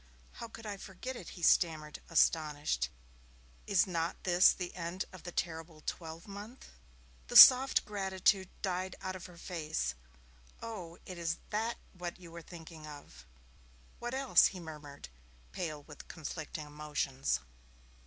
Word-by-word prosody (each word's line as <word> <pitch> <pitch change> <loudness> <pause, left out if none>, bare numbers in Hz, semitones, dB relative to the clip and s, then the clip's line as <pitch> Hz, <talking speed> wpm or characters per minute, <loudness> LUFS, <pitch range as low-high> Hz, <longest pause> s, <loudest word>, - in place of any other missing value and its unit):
'How 235 - -8
could 225 0 -11
I 205 -2 -4
forget 200 +8 -7
it?' 185 -4 -9
he 175 - -9
stammered, 155 -3 +3
astonished. 150 - +2 0.8
'Is 195 -3 +4
not 170 -2 -2
this 180 0 +6
the 180 -2 -5
end 175 +2 -4
of 185 - -10
the 175 - -7
terrible 160 -2 -4
twelve 165 +1 -5
month?' 205 +5 -9 0.6
The - - +4
soft 260 +1 +10
gratitude 190 -1 +1
died 185 -1 -1
out 185 -1 -4
of 185 - -8
her 175 -1 -14
face. 155 - -2 0.7
'Oh, 185 -7 -7
is 170 -2 -3
that 225 +2 -1 0.2
what 180 -1 -6
you 170 -2 -12
were 170 0 -8
thinking 165 -2 -11
of?' 145 - -12 0.7
'What 240 +2 -3
else?' 270 -1 +6
he 190 - -7
murmured, 150 - -9 0.4
pale 155 -5 -4
with - - -12
conflicting 155 -1 -6
emotions. 145 - -1
170 Hz, 140 wpm, -33 LUFS, 155-190 Hz, 0.8 s, soft